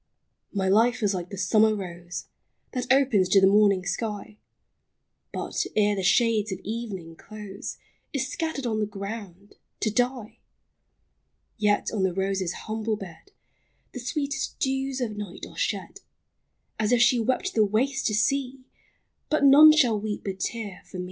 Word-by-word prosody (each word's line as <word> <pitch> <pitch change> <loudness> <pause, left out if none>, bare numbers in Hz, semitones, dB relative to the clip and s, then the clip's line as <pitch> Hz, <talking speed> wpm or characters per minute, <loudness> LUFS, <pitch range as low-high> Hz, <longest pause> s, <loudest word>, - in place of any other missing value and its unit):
My 195 -2 -1
life 230 +4 +3
is 205 -1 +2
like 180 -1 -4
the 200 - -7
summer 215 +4 +3
rose, 175 -3 -7 0.5
That 250 -1 -2
opens 250 -9 +4
to 195 - +6
the 190 - +5
morning 200 -2 +4
sky, 210 +2 -4 0.9
But, - - -2
ere 210 -1 +3
the 195 - -2
shades 215 +1 +2
of 190 - -3
evening 200 -7 -5
close, 210 +1 -8 0.3
Is 270 -2 -1
scattered 305 -2 -3
on 220 -2 -1
the 210 - 0
ground 200 -1 -8
— - - -52
to 215 - +1
die! 245 -1 -1 1.2
Yet 205 -1 +1
on 210 - -1
the 190 -2 +1
rose's 190 -2 -1
humble 220 0 -2
bed 195 - -11 0.6
The 255 - -6
sweetest 285 +4 -3
dews 270 0 -1
of 220 -4 -2
night 205 -3 -7
are - - -15
shed, - - -3 0.8
As 215 +1 +1
if 245 - +4
she 240 +1 +5
wept 260 - 0
the 220 - +4
waste 240 +7 0
to 215 - 0
see, 265 +4 0 0.3
— - - -48
But 305 -1 +1
none 295 +3 +9
shall 245 -9 +3
weep 210 -1 -4
a 195 - -2
tear 200 0 -5
for - - -8
me - - -5
215 Hz, 165 wpm, -26 LUFS, 195-250 Hz, 1.2 s, none